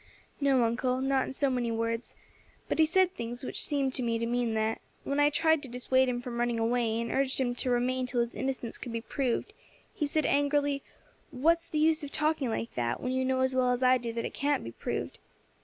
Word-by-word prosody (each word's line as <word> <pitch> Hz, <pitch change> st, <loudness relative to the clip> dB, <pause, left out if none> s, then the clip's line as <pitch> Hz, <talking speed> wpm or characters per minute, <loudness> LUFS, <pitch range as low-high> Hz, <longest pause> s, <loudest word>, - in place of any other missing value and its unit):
"No, 275 Hz, -3 st, +3 dB
uncle, 250 Hz, +2 st, 0 dB
not 270 Hz, 0 st, +1 dB
in -, -, -5 dB
so 275 Hz, 0 st, +1 dB
many 245 Hz, -2 st, -1 dB
words, 230 Hz, +1 st, -2 dB, 0.5 s
but -, -, -2 dB
he 315 Hz, -, +6 dB
said 370 Hz, +2 st, +3 dB
things 240 Hz, -3 st, -6 dB
which -, -, -1 dB
seemed 275 Hz, -3 st, 0 dB
to 260 Hz, -, 0 dB
me 230 Hz, -2 st, 0 dB
to 230 Hz, -, -2 dB
mean 235 Hz, -1 st, 0 dB
that. 220 Hz, +1 st, 0 dB, 0.2 s
When 280 Hz, +1 st, -1 dB
I 290 Hz, 0 st, +5 dB
tried 320 Hz, 0 st, +2 dB
to 270 Hz, -, -8 dB
dissuade 260 Hz, +1 st, +2 dB
him 245 Hz, 0 st, -2 dB
from 240 Hz, -1 st, -5 dB
running 240 Hz, -1 st, 0 dB
away, 230 Hz, -1 st, +1 dB
and 230 Hz, 0 st, -3 dB
urged 270 Hz, 0 st, +1 dB
him 245 Hz, -2 st, +1 dB
to 255 Hz, -, 0 dB
remain 250 Hz, +1 st, +1 dB
till 245 Hz, -1 st, 0 dB
his 235 Hz, 0 st, -2 dB
innocence 260 Hz, -3 st, -3 dB
could 240 Hz, -, -6 dB
be 230 Hz, -, -2 dB
proved, 265 Hz, -, -2 dB, 0.4 s
he 300 Hz, -, -1 dB
said 310 Hz, +2 st, 0 dB
angrily, 285 Hz, 0 st, +2 dB, 0.5 s
'What's 330 Hz, +5 st, +2 dB
the 320 Hz, -, -3 dB
use 315 Hz, +1 st, +3 dB
of 285 Hz, -, -6 dB
talking 305 Hz, -4 st, +1 dB
like 230 Hz, +1 st, -3 dB
that, 120 Hz, -1 st, -1 dB
when 255 Hz, -, -2 dB
you 260 Hz, 0 st, 0 dB
know 260 Hz, 0 st, +1 dB
as 260 Hz, 0 st, +1 dB
well 255 Hz, -1 st, +2 dB
as 250 Hz, +1 st, 0 dB
I 255 Hz, 0 st, +5 dB
do 235 Hz, -1 st, -4 dB
that 230 Hz, -, -3 dB
it -, -, -5 dB
can't 290 Hz, +1 st, 0 dB
be 115 Hz, -, -6 dB
proved.' -, -, -4 dB
255 Hz, 235 wpm, -29 LUFS, 235-280 Hz, 0.5 s, he